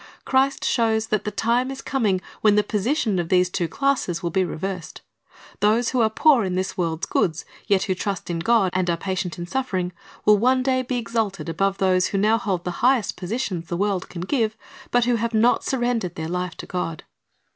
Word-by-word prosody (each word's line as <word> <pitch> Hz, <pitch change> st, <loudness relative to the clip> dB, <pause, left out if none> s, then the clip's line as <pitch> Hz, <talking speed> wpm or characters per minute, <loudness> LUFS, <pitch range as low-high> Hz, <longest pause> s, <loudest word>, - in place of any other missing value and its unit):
Christ 270 Hz, +1 st, +2 dB
shows 225 Hz, -2 st, +2 dB
that 210 Hz, -, 0 dB
the -, -, 0 dB
time 235 Hz, +5 st, 0 dB
is 270 Hz, 0 st, -6 dB
coming 210 Hz, -9 st, 0 dB, 0.2 s
when 210 Hz, -1 st, +5 dB
the 210 Hz, -, +4 dB
position 215 Hz, -, 0 dB
of 170 Hz, -1 st, -3 dB
the 180 Hz, -1 st, +4 dB
two 180 Hz, -1 st, -2 dB
classes 255 Hz, -, -1 dB
will 170 Hz, -, -1 dB
be 190 Hz, +3 st, +2 dB
reversed. 180 Hz, +1 st, -5 dB, 0.6 s
Those 220 Hz, +4 st, +3 dB
who 255 Hz, -, +1 dB
are 220 Hz, -, +4 dB
poor 255 Hz, +2 st, +4 dB
in 185 Hz, -2 st, -2 dB
this 185 Hz, 0 st, -2 dB
world's 165 Hz, -2 st, -1 dB
goods, 160 Hz, -2 st, 0 dB, 0.2 s
yet 200 Hz, -3 st, +3 dB
who 190 Hz, -, 0 dB
trust 195 Hz, +1 st, -4 dB
in 170 Hz, -1 st, -2 dB
God 205 Hz, 0 st, +3 dB
and 185 Hz, -1 st, 0 dB
are 170 Hz, -, +1 dB
patient 185 Hz, -1 st, -3 dB
in 175 Hz, -, -5 dB
suffering, 185 Hz, -4 st, -2 dB, 0.3 s
will 210 Hz, -1 st, +6 dB
one 255 Hz, +3 st, +3 dB
day 255 Hz, -1 st, +2 dB
be 255 Hz, 0 st, -3 dB
exalted 225 Hz, -6 st, -2 dB
above 195 Hz, +4 st, 0 dB
those 185 Hz, -1 st, +2 dB
who 200 Hz, -, -2 dB
now 215 Hz, +3 st, +3 dB
hold 190 Hz, -6 st, -2 dB
the 180 Hz, -, -2 dB
highest 250 Hz, -3 st, +3 dB
positions 185 Hz, -3 st, -3 dB
the 170 Hz, -, -3 dB
world 195 Hz, -1 st, -1 dB
can 170 Hz, -, -7 dB
give, 220 Hz, +1 st, 0 dB, 0.3 s
but 245 Hz, -1 st, +3 dB
who 245 Hz, -1 st, +2 dB
have 230 Hz, 0 st, -2 dB
not 230 Hz, +3 st, +3 dB
surrendered 240 Hz, -8 st, -1 dB
their 160 Hz, 0 st, -4 dB
life 180 Hz, 0 st, -3 dB
to -, -, -7 dB
God. 170 Hz, -4 st, -4 dB
200 Hz, 210 wpm, -23 LUFS, 180-235 Hz, 0.6 s, will